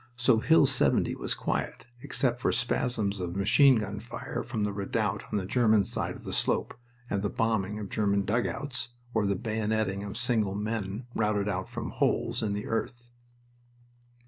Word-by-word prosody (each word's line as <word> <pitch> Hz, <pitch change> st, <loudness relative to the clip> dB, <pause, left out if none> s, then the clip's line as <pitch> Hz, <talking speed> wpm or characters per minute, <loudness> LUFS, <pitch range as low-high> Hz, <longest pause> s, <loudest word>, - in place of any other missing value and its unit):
So 120 Hz, -1 st, +3 dB
Hill 160 Hz, +4 st, +5 dB
70 130 Hz, -1 st, +2 dB
was -, -, -2 dB
quiet, -, -, -3 dB, 0.2 s
except 125 Hz, -2 st, -1 dB
for -, -, +2 dB
spasms 115 Hz, -4 st, 0 dB
of 90 Hz, -1 st, -4 dB
machine 125 Hz, +8 st, +5 dB
gun 105 Hz, -2 st, -2 dB
fire 115 Hz, +3 st, -5 dB
from 115 Hz, -3 st, -3 dB
the 105 Hz, -1 st, -1 dB
redoubt 105 Hz, +1 st, -1 dB
on -, -, +1 dB
the 95 Hz, -, -2 dB
German 110 Hz, -1 st, +3 dB
side -, -, -3 dB
of -, -, -12 dB
the -, -, -5 dB
slope -, -, +1 dB, 0.3 s
and 100 Hz, -4 st, -1 dB
the 105 Hz, -, 0 dB
bombing 105 Hz, -3 st, 0 dB
of 105 Hz, -1 st, -5 dB
German 100 Hz, -1 st, +1 dB
dugouts, 125 Hz, +5 st, -2 dB, 0.2 s
or 110 Hz, -3 st, +2 dB
the 100 Hz, -, +1 dB
bayoneting 110 Hz, -1 st, -1 dB
of 100 Hz, +1 st, -6 dB
single 115 Hz, -5 st, +1 dB
men 105 Hz, +1 st, -3 dB
routed 105 Hz, -2 st, +1 dB
out 95 Hz, -2 st, -2 dB
from -, -, -5 dB
holes 115 Hz, +1 st, +1 dB
in 105 Hz, -2 st, -1 dB
the 105 Hz, 0 st, -3 dB
earth. 120 Hz, +2 st, -3 dB
110 Hz, 170 wpm, -29 LUFS, 100-120 Hz, 0.3 s, Hill